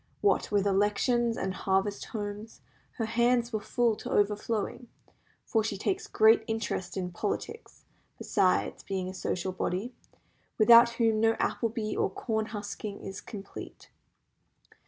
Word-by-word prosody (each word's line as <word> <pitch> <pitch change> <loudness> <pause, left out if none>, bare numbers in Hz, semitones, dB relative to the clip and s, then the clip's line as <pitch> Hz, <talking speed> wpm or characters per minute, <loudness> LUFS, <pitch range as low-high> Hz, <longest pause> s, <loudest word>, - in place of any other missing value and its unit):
What 410 - +2
with 205 -1 +2
elections 210 +4 +2
and 190 - -2
harvest 195 +2 0
homes, 210 0 -6 0.3
her 225 - -2
hands 235 +1 +1
were 215 - -1
full 235 +1 +1
to - - -7
overflowing; 210 +3 0 0.6
for 225 -3 +1
she 210 -2 -2
takes 385 - -2
great 220 - +5
interest 215 -5 -3
in 180 -1 -3
politics, 455 - -5 0.3
besides 190 -3 +1
being 190 -1 -3
a - - -7
social 185 0 -2
body, 185 +6 -3 0.6
without 235 +2 +7
whom 225 -2 +2
no 225 +1 +4
apple 230 - 0
bee 215 -1 -3
or - - +1
corn 220 +2 -2
husking 205 -1 -6
is 195 0 -7
complete. 200 -3 -10
215 Hz, 135 wpm, -29 LUFS, 200-230 Hz, 0.6 s, without